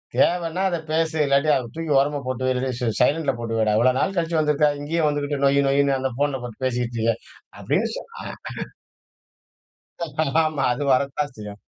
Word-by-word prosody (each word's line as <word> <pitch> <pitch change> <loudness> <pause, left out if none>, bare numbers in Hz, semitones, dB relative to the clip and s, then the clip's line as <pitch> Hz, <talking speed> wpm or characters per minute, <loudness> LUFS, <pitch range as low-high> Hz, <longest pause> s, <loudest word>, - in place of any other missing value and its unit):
தேவனா 175 +1 +2
அத 175 - -1
பேசு, 160 0 +1
இல்லாட்டி 140 +2 +2
அத 120 -3 -2
தூக்கி 165 -1 -3
ஓரமா 145 +1 0
போட்டு 130 0 -3
வை. - - +2
இல்லாட்டி 130 0 -2
ஸ் - - -11
சை - - +2
சைலண்ட்ல 145 -2 +2
போட்டு 115 -1 -3
வைடா. 110 -1 +2
இவ்வளோ 125 +3 +4
நாள் 195 - 0
கழிச்சு 165 -1 +1
வந்துருக்க, 150 -1 +3
இங்கேயும் 155 +1 0
வந்துக்கிட்டு 145 -1 -1
நொய் 140 +1 +4
நொய்னு 140 0 +3
அந்த 135 0 -1
போன்ல 145 -2 +1
போட்டு 120 +1 -8
பேசிட்டு 120 -2 -1
இருக்க" 115 0 +2 0.5
அப்டின்னு - - 0
சொல் - - -10
அ - - -8
அ. - - -7 1.8
ஆமா. 150 -4 -1
அது 140 +4 -3
வரத்தான் 140 +2 0
செய்யும். 105 -1 -9
140 Hz, 185 wpm, -23 LUFS, 125-155 Hz, 1.8 s, இவ்வளோ